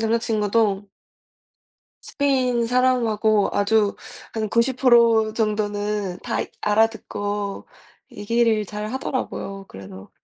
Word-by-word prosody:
남자친구도 220 -2 0 1.1
스페인 255 -4 0
사람하고 230 -4 +2
아주 205 0 +2 0.4
한 220 -2 -2
90% 235 -2 +3
정도는 210 -3 -2
다 - - -2
이 - - -8
알아듣고 205 -2 -1 0.5
얘기를 220 +1 +1
잘 210 +1 -6
하더라고요. 195 -7 -4
그래서 95 0 -11
215 Hz, 210 characters per minute, -22 LUFS, 205-235 Hz, 1.1 s, 90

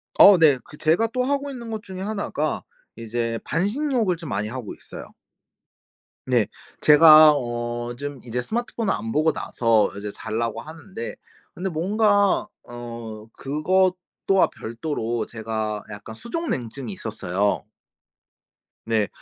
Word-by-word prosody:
어 200 -2 +9
네. 155 -5 +6
그 150 - -14
제가 165 +10 +2
또 255 -1 +1
하고 280 +1 -1
있는 240 -3 -8
것 220 -1 -4
중에 190 -3 -8
하나가 205 +1 -2 0.3
이제 115 0 -3
반신욕을 215 - 0
좀 165 -5 -8
많이 105 +2 -1
하고 120 -2 -6
있어요. - - -10 1.2
네. 120 -4 +4 0.4
제가 155 0 +9
어 120 -1 -3
좀 145 -1 -6
이제 125 +1 -2
스마트폰을 230 - -2
안 115 0 -4
보고 155 +1 +3
나서 115 -6 +2
이제 105 0 -5
잘라고 115 +1 -3
하는데 160 - -8 0.4
근데 190 +2 -3
뭔가 205 +4 +2 0.2
어 115 -2 -8
그것도 180 +7 +1 0.4
와 195 - +5
별도로 115 -2 -3
제가 110 -2 -4
약간 105 +1 -8
수족냉증이 135 - -4
있었어요. 95 +1 -1 1.2
네. 110 -2 +1
140 Hz, 255 characters per minute, -24 LUFS, 115-190 Hz, 1.2 s, 어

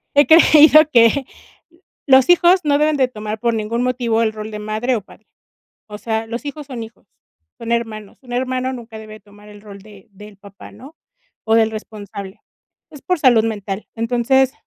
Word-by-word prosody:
he 285 - +4
creído 310 -1 +6
que 235 +4 +4 0.8
los 265 +2 +5
hijos 355 +1 +4
no 285 -1 +2
deben 300 0 +1
de 260 -2 +2
tomar 215 -2 -7
por 235 0 -1
ningún 220 +2 -3
motivo 240 -3 -1
el 220 - 0
rol 215 0 -8
de 210 - -7
madre 215 +4 -2
o - - -7
padre. 210 +2 -20 0.6
O 210 0 -9
sea, 225 0 -3
los 235 +5 -6
hijos 285 0 -7
son 240 -4 -7
hijos, 225 +1 -14 0.5
son 230 0 -7
hermanos, 220 -3 -4
un 245 -1 -12
hermano 255 +1 -2
nunca 230 -3 -10
debe 215 0 -12
tomar 205 +1 -19
el 205 0 -14
rol 200 -2 -12
de 205 -2 -17
del 210 +1 -14
papá, 200 +1 -15
¿no?, 290 +5 -15 0.5
o 220 - +3
del 225 -1 +3
responsable, 205 -2 -9 0.5
es 295 -3 -14
por 360 -2 -1
salud 240 -5 +4
mental. 205 -2 -5
Entonces, 245 +3 +1
230 Hz, 185 wpm, -18 LUFS, 215-260 Hz, 0.8 s, creído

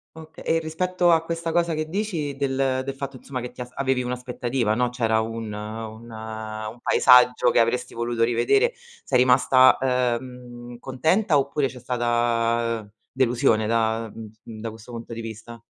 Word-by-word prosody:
Okay, 160 0 -12
e 165 - +2
rispetto 175 +2 +1
a 165 -1 +3
questa 165 0 -3
cosa 170 0 +1
che 155 0 -2
dici, 170 -7 -2
del 135 -1 0
del 135 0 -5
fatto 135 -1 -6
insomma 130 0 -6
che 125 +1 -6
ti 125 - -10
as 125 - -6
avevi 135 -2 0
un'aspettativa, 125 -2 -2
no, 125 +2 +1
c'era 115 -3 +1
un 115 -1 -5
un 110 +2 -7
un 110 0 -7
paesaggio 125 -1 +5
che - - +3
avresti 125 +2 0
voluto 120 0 -1
rivedere, 120 - +2 0.3
sei 125 -2 +2
rimasta, 130 +1 +5 0.4
uhm, 120 -1 -11
contenta 155 - +1
oppure 140 +1 0
c'è 130 -1 -10
stata 120 -2 0 0.2
delusione 120 -4 +2
da 115 0 0
mhmm, 110 -2 -9 0.3
da 115 - -4
questo 115 +2 -13
punto 115 0 -7
di 115 - -5
vista? 115 +1 -9
125 Hz, 160 wpm, -24 LUFS, 115-135 Hz, 0.4 s, paesaggio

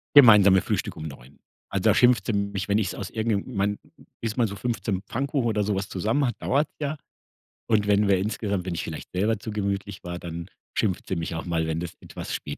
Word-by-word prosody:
Gemeinsame 105 -8 +9
Frühstück - - -2
um 80 0 -6
9:00. 65 -1 -12 0.3
Also, - - -2
da - - +5
schimpfte 120 -4 +4
sie - - +2
mich, 100 -1 -2
wenn 100 - +3
ich's 100 -4 0
aus 100 - -5
irgend 110 -2 -1
'nem 125 - -8
man 100 +1 0 0.4
bis 115 +1 -3
man 115 -2 +3
so 100 - -6
15 105 -3 -2
Pfannkuchen 135 -1 0
oder 105 -2 +1
sowas 100 -1 -1
zusammen 110 +10 +1
hat 120 - -1
dauert's 145 +4 +1
ja, 150 +1 -2 0.7
und 105 -3 +2
wenn 100 0 +4
wir 95 - +5
insgesamt 100 -1 -2
wenn 90 - -2
ich - - -2
vielleicht 80 -2 -7
selber 105 +4 +1
zu 110 - -6
gemütlich 100 -1 -3
war, 90 0 -5
dann 85 +1 -6 0.3
schimpft 100 -5 0
sie 95 - -1
mich 85 0 -3
auch 80 - -4
mal, 80 -2 0
wenn 80 0 -1
das 85 -1 -5
etwas - - -7
spät 70 - -4
100 Hz, 225 wpm, -26 LUFS, 90-110 Hz, 0.7 s, Gemeinsame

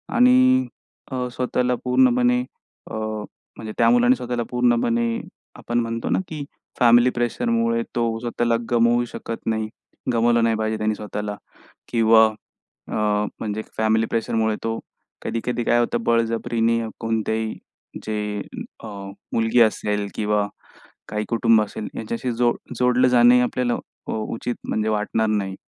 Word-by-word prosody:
आणि 255 +1 +5 0.4
अ, 125 -1 -2
स्वतःला 125 0 0
पूर्णपणे 245 - +3 0.5
अ, - - -4 0.6
म्हणजे 110 -1 -7
त्या 115 - +5
मुलाने 120 +1 +5
स्वतःला 120 -1 -3
पूर्णपणे 120 -1 +2 0.5
आपण 120 0 -2
म्हणतो 115 0 -2
ना, - - +2
की 155 -2 -5 0.4
फॅमिली 120 +1 +6
प्रेशरमुळे 230 - 0
तो 115 -1 0
स्वतःला 120 0 0 0.2
गमवू 120 0 +3
शकत 115 -1 -7
नाही, 110 -1 -1 0.4
गमावलं 120 0 +3
नाही 115 -1 +2
पाहिजे 110 0 -1
त्याने 110 0 0
स्वतःला 105 0 -5 0.5
किंवा 110 -1 +5 0.6
अ, - - -5 0.5
म्हणजे 110 0 -3 0.2
फॅमिली 110 0 +2
प्रेशरमुळे 110 -1 0
तो 115 0 -1 0.4
कधी-कधी 120 +1 -2
काय 120 - +3
होतं 120 0 0
बळजबरीने 115 0 +1 0.2
कोणत्याही 110 -1 -1 0.5
जे 105 -1 -2 0.5
अ, - - -6 0.4
मुलगी 115 +1 +2
असेल 105 -2 0
किंवा 105 -1 +1 0.6
काही 105 0 -2
कुटुंब 115 -2 +4
असेल 105 0 -5
याच्याशी 115 +3 -3
जो 120 0 +2 0.3
जोडलं 125 0 +4
जाणंही 125 0 +6
आपल्याला 125 0 0
अ, - - -10
उचित 115 +2 -3
म्हणजे 110 0 0
वाटणार 110 +1 0
नाही. 100 -3 -1
115 Hz, 130 wpm, -22 LUFS, 110-125 Hz, 0.6 s, फॅमिली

